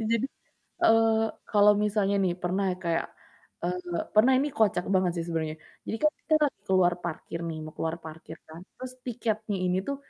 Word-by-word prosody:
Jadi, 230 +2 +1 0.6
eee, 225 0 +5 0.3
kalau 210 0 +6
misalnya 205 -1 +1
nih 180 -2 +1
pernah 185 +3 0 0.2
kayak, 170 -1 0 0.6
eee, 175 0 -2 0.2
pernah 225 +5 +6
ini 285 +3 +1
kocak 200 -5 +2
banget 185 -2 +3
sih 165 - -1
sebenernya. 160 -2 -2 0.3
Jadi - - -2
kan 305 - +5
kita 315 - +1
lagi 290 - -2
ke - - +1
luar 175 -1 +4
parkir 165 0 -4
nih 160 -1 -4
mau 155 - -9
keluar 160 0 -2
parkir 160 0 -9
kan, 160 +2 -10 0.2
terus 255 0 -7
tiketnya 220 -3 -2
ini 180 0 +1
tuh 280 - -2
190 Hz, 180 wpm, -28 LUFS, 170-225 Hz, 0.6 s, kalau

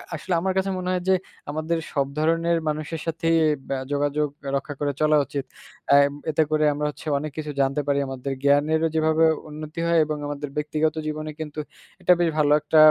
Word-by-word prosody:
আসলে 165 +4 -3
আমার 190 +1 0
কাছে 190 +1 +1
মনে 180 0 -3
হয় 180 -1 0
যে, - - +6 0.4
আমাদের 155 +3 -1 0.2
সব 140 -2 +1
ধরনের 165 +2 +2
মানুষের 155 +2 -3
সাথেই 165 0 +1 0.3
বা 135 - -1 0.2
যোগ 145 0 0
যোগাযোগ 145 +1 0 0.3
রক্ষা 145 +2 -3
করে 145 -1 0
চলা 155 0 +4
উচিত। 140 -1 -4 0.5
আ - - +7 0.4
এতে 155 +1 +2
করে 155 0 +2
আমরা 150 +1 -2
হচ্ছে 150 - -12
অনেক 150 +1 -4
কিছু 155 -1 -3
জানতে 135 +2 +1
পারি 140 0 +2
আমাদের 135 +1 -4
জ্ঞানেরও 150 +3 +3
যেভাবে 160 0 +3 0.3
উন্নতি 155 +1 -7
হয় 170 0 +4
এবং 155 0 -3
আমাদের 145 0 -4
ব্যক্তিগত 155 +1 0
জীবনে 155 0 -4
কিন্তু, 155 -1 -5 0.4
এটা 180 - +4
বেশ 170 -1 +3
ভালো 145 -1 +3
একটা 150 +1 +1
155 Hz, 190 wpm, -24 LUFS, 145-160 Hz, 0.5 s, আ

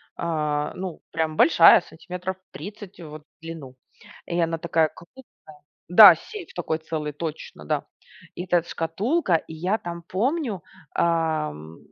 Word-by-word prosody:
а, 150 -3 -2
ну, 185 -3 -6
прям 160 -1 -1
большая, 165 +2 +7
сантиметров 180 +2 -7
30 200 +2 -10
вот 155 -1 -10
в 160 - -61
длину, 160 -6 -9 0.5
и 175 0 -2
она 165 -1 0
такая 160 -1 +1
крупная. 250 +9 -15 0.6
Да, 180 0 +10
сейф 410 - -10
такой 160 -2 -2
целый, 155 -2 -4
точно, 150 - -7
да. - - -1 0.5
И 175 - -5
этот 175 -2 +1
шкатулка, 190 - -1
и 160 0 -2
я 185 +7 -1
там 170 0 -7
помню, 225 - -2 0.3
ам, 155 - -1
165 Hz, 135 wpm, -24 LUFS, 155-185 Hz, 0.6 s, Да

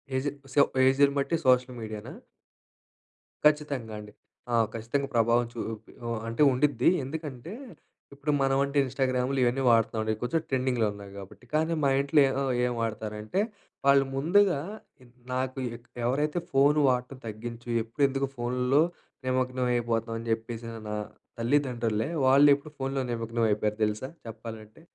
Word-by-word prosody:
ఏజే. 135 +2 0 0.2
So, 145 - +3 0.3
ఏజ్‌ని 140 +1 +4
బట్టి 140 +4 0
social 125 0 +3
మీడియానా? 110 -1 -7 1.3
ఖచ్చితంగా 145 -7 +2
అండి. 105 0 -10 0.4
ఆ! - - +4 0.2
ఖచ్చితంగా 120 +5 -2
ప్రభావం 115 +1 +3
చూపి 110 -1 -6 0.2
ఓ - - -2 0.2
అంటే 115 +4 -2
ఉండుద్ది. 140 +3 +3
ఎందుకంటే, 150 +2 -6 0.6
ఇప్పుడు 145 +2 -2
మనమంటే 135 +1 +1
ఇన్‌‌స్టా‌గ్రామ్‌లు 130 0 0
ఇవన్నీ 125 +2 +1
వాడుతున్నాం 115 -1 +3
అండి. 110 0 0
కొంచెం 125 +7 0
ట్రెండింగ్‌లో 130 -4 +1
ఉన్నాయి 100 -1 -11
కాబట్టి. 95 -1 -12
కానీ 160 +2 +2
మా 140 - +4
ఇంట్లో 140 +2 +4
ఏ - - 0
ఆహ్, 135 -2 0
ఏం 125 - 0
వాడతారంటే, 110 - -2 0.5
వాళ్ళు 140 0 +6
ముందుగా 175 +3 +3 0.7
నాకు 130 +1 -2 0.5
ఎవరైతే 150 +7 0
ఫోన్ 140 +2 +4
వాడటం 125 +1 -1
తగ్గించు 115 +2 -7
ఎప్పుడు 115 +6 -3
ఎందుకు 135 0 -1
ఫోన్‌లో 125 +4 +2 0.5
నిమగ్నం 130 0 0
అయిపోతావ్? 115 -1 -1
అని 115 +1 -7
చెప్పేసి 115 +1 -3
న - - -7
నా 105 - -2 0.4
తల్లిదండ్రులే 120 -3 0 0.2
వాళ్ళు 140 +2 +7
ఇప్పుడు 145 +2 -11
ఫోన్‌లో 135 0 -1
నిమగ్నం 115 0 -2
అయిపోయారు 105 0 0
తెలుసా? 105 +4 -3 0.2
చెప్పాలంటే. 110 +2 -9
125 Hz, 135 wpm, -28 LUFS, 115-140 Hz, 1.3 s, వాళ్ళు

